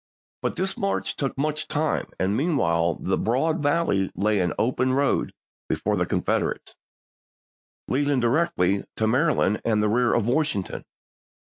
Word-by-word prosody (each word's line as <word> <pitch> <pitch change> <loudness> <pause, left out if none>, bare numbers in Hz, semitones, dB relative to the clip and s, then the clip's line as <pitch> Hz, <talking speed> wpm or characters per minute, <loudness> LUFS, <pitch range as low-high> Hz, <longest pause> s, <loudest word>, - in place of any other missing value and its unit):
But - - -2
this 190 0 -1
march 195 0 -1
took 135 -2 -3
much 155 +2 -1
time, 155 +1 -1
and 95 +2 +1
meanwhile 85 - +1
the - - -1
broad 155 +8 0
valley 145 - +1
lay 105 0 +1
an 90 -2 +1
open 130 +2 +1
road 140 0 +1 0.4
before - - 0
the - - 0
Confederates, - - -1 1.1
leading 140 0 +1
directly 120 - +1
to 110 - 0
Mary 140 +8 +2
land 105 - +1
and 110 -2 +1
the 105 - +2
rear 120 +2 +2
of 115 - +1
Washington. 125 -6 -1
130 Hz, 145 wpm, -24 LUFS, 105-150 Hz, 1.1 s, Mary